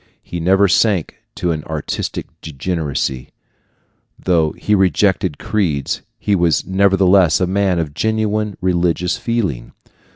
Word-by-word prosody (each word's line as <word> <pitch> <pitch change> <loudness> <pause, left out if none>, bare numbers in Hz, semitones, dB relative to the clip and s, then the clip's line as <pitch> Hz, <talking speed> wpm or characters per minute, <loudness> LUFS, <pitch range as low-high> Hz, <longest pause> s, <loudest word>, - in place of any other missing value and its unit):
He 85 - -6
never 95 +4 +3
sank 95 -2 +1 0.2
to 90 - -1
an 75 -2 -3
artistic 80 -2 -4 0.2
degeneracy. 75 -4 -3 0.9
Though 80 -4 +1
he 105 - -2
rejected 95 -4 +2
creeds, 85 -10 -1 0.2
he 105 - -1
was 85 -3 +1
nevertheless 95 -3 +3
a 90 - +2
man 95 0 +1
of 80 -4 -2
genuine 110 +2 -1
religious 90 -1 0
feeling. 90 - -2
90 Hz, 120 wpm, -18 LUFS, 80-100 Hz, 0.9 s, never